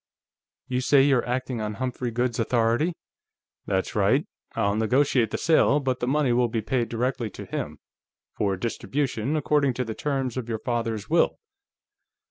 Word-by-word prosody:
"You 125 0 -1
say 135 +1 +5
you're 135 -4 +3
acting 125 -1 -2
on 105 0 -3
Humphrey 125 +1 -3
Goode's 120 +1 -1
authority?" 120 +8 +2 0.7
"That's - - -1
right. - - +2 0.3
I'll 100 0 +1
negotiate 120 +1 +2
the - - -2
sale, 155 -2 +4
but 130 -3 -1
the 125 - -2
money 140 -2 +2
will 120 0 +3
be 115 -1 -2
paid 120 +1 0
directly 120 0 -1
to - - -9
him, - - -4 0.6
for 100 -2 0
distribution 130 +4 -2
according 145 -3 +2
to 125 - -1
the 110 - -4
terms 135 -2 -2
of 120 -2 -4
your 115 - -1
father's 115 -3 -2
will." - - +2
125 Hz, 160 wpm, -25 LUFS, 115-135 Hz, 0.7 s, say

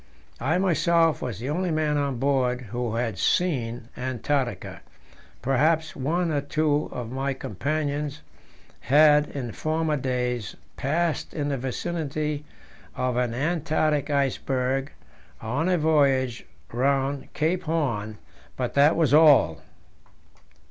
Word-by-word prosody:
I 140 +8 +1
myself 170 -3 +2
was 125 -6 -4
the 125 +6 -4
only 180 +3 -1
man 155 -2 +1
on 140 -3 -1
board 130 -1 +1
who 120 -2 -2
had 115 -4 -2
seen 120 -9 0
Antarctica; 130 +1 -2 0.6
perhaps 150 +5 +2
one 165 +5 0
or 145 -2 0
two 150 +1 0
of 120 -2 -6
my 135 +1 -2
companions 145 +5 -3 0.6
had 150 +1 +5
in 125 -5 -5
former 155 +3 -1
days 125 -4 -2 0.2
passed 160 +4 -1
in 145 -2 -1
the 140 - -1
vicinity 150 +2 -3 0.5
of 125 -1 -1
an 120 -1 0
Antarctic 155 0 0
iceberg 135 -1 0 0.5
on 140 +11 -1
a 180 - +3
voyage 140 -6 +2 0.2
round 135 +2 0
Cape 165 +4 0
Horn, 120 -10 -1 0.4
but 125 -2 -2
that 145 +3 +5
was 155 -5 +2
all. 145 - +6
140 Hz, 120 wpm, -25 LUFS, 125-155 Hz, 0.6 s, all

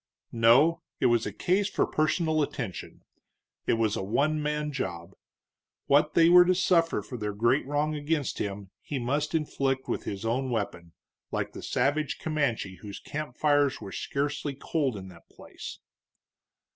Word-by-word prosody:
No, 130 +9 +5 0.2
it - - +1
was 120 -3 +3
a - - -3
case 190 - +1
for - - +1
personal 155 0 +1
attention; 115 -9 -5 0.6
it - - +3
was 115 -2 +1
a - - -2
one 145 +10 +1
man 150 0 -1
job. 85 -11 -5 0.7
What 145 +2 +3
they 165 -1 +6
were 180 +1 +9
to 185 +1 +3
suffer 165 - +2
for 120 +4 -7
their 105 -1 -2
great 120 +6 +2
wrong 145 +2 0
against 150 -2 -1
him, 100 -1 -4
he 145 - -4
must 145 +6 -1
inflict 135 -4 -1
with - - -3
his 100 +2 -5
own 130 +4 0
weapon, 85 -8 -3 0.4
like - - -3
the - - -8
savage 145 +4 0
Comanche 135 - -1
whose 100 -2 -8
camp 150 -4 -6
fires 145 -2 +2
were 100 -3 -8
scarcely 140 +3 -2
cold 140 -4 -1
in 95 -1 -8
that 85 -2 -17
place. - - -10
140 Hz, 160 wpm, -28 LUFS, 115-155 Hz, 0.7 s, were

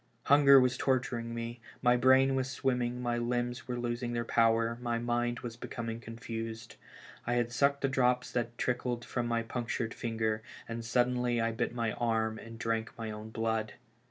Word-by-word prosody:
Hunger 140 -1 +7
was 125 -1 +2
torturing 120 -3 0
me, 115 0 -5 0.2
my 120 0 +5
brain 130 +2 +5
was 135 0 0
swimming, 125 -2 -1
my 120 -1 0
limbs 120 0 -2
were 125 -1 -2
losing 120 0 -2
their 120 0 -1
power, 115 0 +2
my 120 -1 0
mind 120 0 -1
was 120 -2 -6
becoming 115 -1 -5
confused. 115 0 -6 0.5
I 120 - +1
had 120 -1 +1
sucked 140 +3 +2
the 135 - +2
drops 125 -2 +2
that 120 -1 -2
trickled 125 -1 -1
from 120 -1 -2
my 115 -1 0
punctured 115 0 -3
finger, 110 -2 -1 0.3
and 115 0 -4
suddenly 125 +1 +1
I 115 0 +1
bit 120 +1 -2
my 115 -2 0
arm 110 -1 0
and 115 0 -10
drank 115 0 -2
my 115 -1 -4
own 105 +1 -7
blood 110 -1 -1
120 Hz, 175 wpm, -31 LUFS, 115-125 Hz, 0.5 s, Hunger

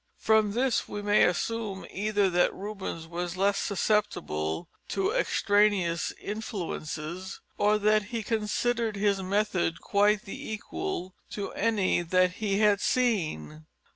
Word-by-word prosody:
From 220 -2 +3
this 250 +1 +1
we 205 0 -5
may 205 +1 +5
assume 200 +2 -2
either 205 0 +1
that 175 0 +3
Rubens 195 -5 -5
was 175 +1 -4
less 200 +1 +2
susceptible 185 - -1 0.2
to 390 +1 0
extraneous 205 - +2
influences, 185 -4 -5 0.2
or 210 +1 +3
that 210 0 +3
he 225 +1 -4
considered 225 +1 0
his 200 -1 +1
method 190 -3 0
quite 205 +1 +2
the 200 - -7
equal 215 - -4 0.2
to 200 -1 -4
any 205 -5 +1
that 185 +1 +2
he 200 -2 +1
had 205 -1 +4
seen. 155 - 0
205 Hz, 125 wpm, -28 LUFS, 185-215 Hz, 0.2 s, may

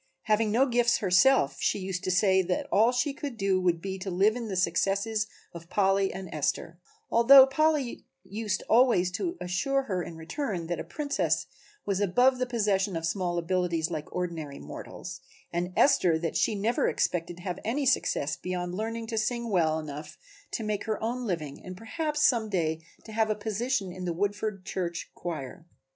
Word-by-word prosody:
Having 215 0 +2
no 240 +6 +4
gifts 240 -2 +3
herself 190 - +4
she - - +1
used 190 -1 -4
to - - 0
say 190 +1 +4
that 180 0 -1
all 225 +4 +5
she 250 +3 0
could 280 -4 -6
do 195 -2 +1
would 175 -2 +2
be 190 -1 -4
to 190 +1 -4
live 195 +5 +3
in 240 -2 -4
the 195 - -4
successes 195 +5 +1 0.3
of 170 0 -10
Polly 195 -1 +2
and 190 0 -7
Esther; 160 +2 -2 0.3
although 260 +4 +9
Polly 295 -2 0 0.2
used 210 -1 -3
always 225 -7 +4
to 340 - -3
assure 275 +10 0
her 190 -8 -2
in 170 - -7
return 175 - -4
that 170 0 -3
a - - -3
Princess 285 -1 -1 0.4
was 195 -1 0
above 245 +7 +3
the 255 - 0
possession 205 -5 0
of 165 0 -2
small 175 0 -1
abilities 170 -1 0
like 155 -2 -5
ordinary 165 -6 -4
mortals, 180 0 -8 0.3
and 175 +1 -1
Esther 175 - +4
that 165 0 -3
she 215 - +2
never 220 +4 +1
expected 175 -1 -1
to 175 - -12
have 180 -2 -4
any 270 +6 -1
success 150 - +1
beyond 180 -1 -4
learning 225 +3 -3
to 225 -1 -2
sing 235 +1 -2
well 160 -4 +2
enough 155 +2 -7 0.3
to 225 - -4
make 210 -1 -2
her 220 -1 -2
own 240 +2 -2
living 155 -7 -4
and 185 0 -8
perhaps 300 - -2
some 230 -4 +1
day 160 -4 -1 0.2
to 220 - -11
have 220 0 +1
a 215 - +1
position 215 0 -2
in 185 0 -6
a 170 - 0
Woodford 205 +1 -2
church 175 -3 -4
choir. 165 0 -6
195 Hz, 185 wpm, -28 LUFS, 175-230 Hz, 0.4 s, although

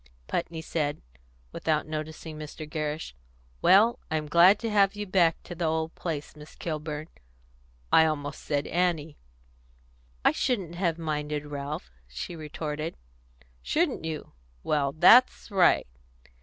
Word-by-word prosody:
Putney 160 - -3
said, 150 -2 -2 0.5
without 155 -1 0
noticing 155 0 -6
Mr. 155 0 -8
Gerrish, 150 - -4 0.5
"Well, 220 +5 +5
I'm 155 -1 -1
glad 180 +7 +6
you've 225 -2 -1
come 200 -1 +2
back 170 -4 +3
to - - -8
the 170 0 -2
old 160 0 -1
place, 155 -4 -5
Miss 150 0 -13
Kilburn 155 -1 -4 0.9
I 160 - +7
almost 145 -2 -3
said 145 -1 -1
Annie." 165 -3 -1 1.1
"I - - +7
shouldn't 195 -10 -1
have 170 -2 0
minded, 150 -2 -3
Ralph," 145 - -5 0.2
she 60 - -6
retorted. 155 0 -5 0.6
"Shouldn't 320 - 0
you? 160 -2 -5 0.3
Well, 145 -2 +1
that's 220 - +5
right." 185 -3 +4
160 Hz, 125 wpm, -27 LUFS, 150-175 Hz, 1.1 s, I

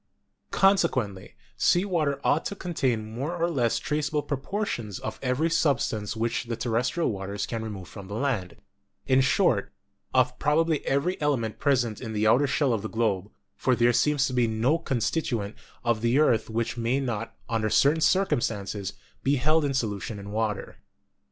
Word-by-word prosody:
Consequently, 130 - +1 0.2
sea 175 +3 +3
water 155 -7 0
ought 155 - +2
to 200 - -3
contain 125 - -2
more 140 +9 -3
or 170 0 +1
less 120 -9 +1
traceable 150 +4 -1
proportions 135 - -3
of 110 - -6
every 130 +5 +1
substance 125 -10 0
which 115 +2 -1
the 115 0 -3
terrestrial 120 +8 0
waters 100 0 -4
can 115 -1 -4
re 110 - -4
move 95 -4 -7
from 100 -3 -10
the 100 - -6
land 110 -8 -1 0.3
— 100 - -49
in 130 0 +4
short, 130 - +2 0.4
of 125 -1 +2
probably 155 +1 +2
every 155 +6 0
element 125 -7 0
present 125 -6 +1
in 110 -3 -5
the 105 0 0
outer 130 +6 +4
shell 140 -1 +1
of 110 - -1
the 110 - -5
globe, 105 -4 0 0.3
for 130 - +1
there 120 0 +3
seems 140 +3 +3
to 130 - -3
be 125 -2 +3
no 115 +9 +1
constituent 120 -6 -1 0.3
of 120 -2 +1
the 120 +3 +2
earth 120 -8 +3
which 115 +3 -2
may 120 +3 +1
not, 115 -4 -4
under 110 -2 0
certain 150 +8 +4
circumstances, 110 - 0 0.3
be 140 +2 +2
held 155 +4 +2
in 140 -2 0
solution 105 -3 -2
in 100 0 -8
water. 105 -2 -2
120 Hz, 170 wpm, -26 LUFS, 110-145 Hz, 0.4 s, in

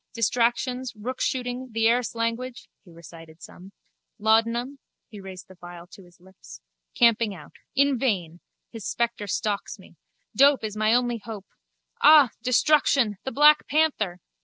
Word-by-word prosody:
Distractions, 245 +2 -1
rookshooting, 250 +2 -4
the 225 0 +2
Erse 240 0 0
language 230 +2 -4 0.2
(he 190 - -19
recited 165 -1 -14
some), 185 +2 -13 0.5
laudanum 230 +5 0 0.3
(he 210 - -10
raised 190 -1 -11
the 190 - -16
phial 175 -1 -12
to 195 - -14
his 175 0 -23
lips), 190 +1 -15 0.4
camping 230 -3 +2
out. 150 -4 -14 0.2
In 280 -2 +2
vain! 180 -10 -2 0.3
His 225 -3 -9
spectre 235 -3 -3
stalks 205 +1 -3
me. - - -19 0.4
Dope 280 -2 +4
is 215 -1 -5
my 215 0 +1
only 240 -1 0
hope... 210 -2 -9 0.6
Ah! 295 -6 +7
Destruction! 255 -3 +2
The 265 - -3
black 300 +2 +4
panther! 270 - 0
230 Hz, 140 wpm, -24 LUFS, 195-255 Hz, 0.6 s, Ah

